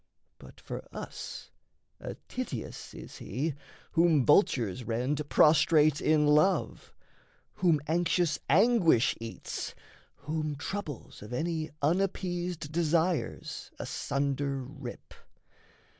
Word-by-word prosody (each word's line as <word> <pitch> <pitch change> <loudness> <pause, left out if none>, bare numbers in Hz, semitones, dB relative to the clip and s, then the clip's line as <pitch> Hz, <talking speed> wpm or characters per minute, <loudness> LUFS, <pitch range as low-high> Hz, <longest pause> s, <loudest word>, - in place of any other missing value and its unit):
But - - -14
for - - -6
us - - -7 0.5
A - - -6
Tityus 240 - -5
is - - -10
he 140 +9 -2 0.4
whom 165 -6 +4
vultures 125 - +3
rend 130 +6 -1
Prostrate 155 -1 +5
in 155 -1 +3
love, 150 +6 +2 0.7
whom 170 -5 +3
anxious 170 -1 +1
anguish 185 - +4
eats, 115 0 -5 0.4
Whom 155 0 -3
troubles 155 - -6
of 105 +4 -8
any 160 +3 -1
unappeased 175 -1 -1
desires 165 +1 0
Asunder 140 -1 -2
rip. 130 -2 -9
155 Hz, 95 wpm, -30 LUFS, 140-170 Hz, 0.7 s, Prostrate